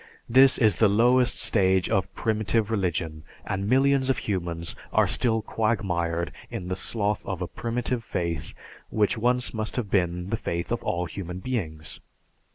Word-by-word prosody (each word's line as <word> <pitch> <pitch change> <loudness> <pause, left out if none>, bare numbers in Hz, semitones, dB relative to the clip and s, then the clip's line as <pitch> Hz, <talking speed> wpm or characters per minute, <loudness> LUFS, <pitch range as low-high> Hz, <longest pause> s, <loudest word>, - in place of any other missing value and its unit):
This 130 +3 +6
is 110 -7 +3
the 110 - +5
lowest 120 +4 +3
stage 95 -5 +3
of 95 0 0
primitive 110 0 0
religion, 80 -6 -1 0.2
and 100 +2 -2
millions 135 +1 +3
of 135 - +2
humans 85 -4 -3 0.2
are - - +4
still 115 -2 0
quagmired 85 -8 -1 0.2
in 100 -7 -5
the 90 - -1
sloth 105 +1 -1
of 95 -3 -3
a 90 - -2
primitive 120 +3 -2
faith 85 -6 -3 0.3
which 105 -2 +2
once 125 +2 +1
must 110 -1 -3
have 115 -6 -3
been 90 0 0
the 115 - +1
faith 85 -1 -3
of 120 - 0
all 85 +1 -1
human 90 +1 -6
beings. 90 -9 -4
100 Hz, 160 wpm, -26 LUFS, 90-115 Hz, 0.3 s, This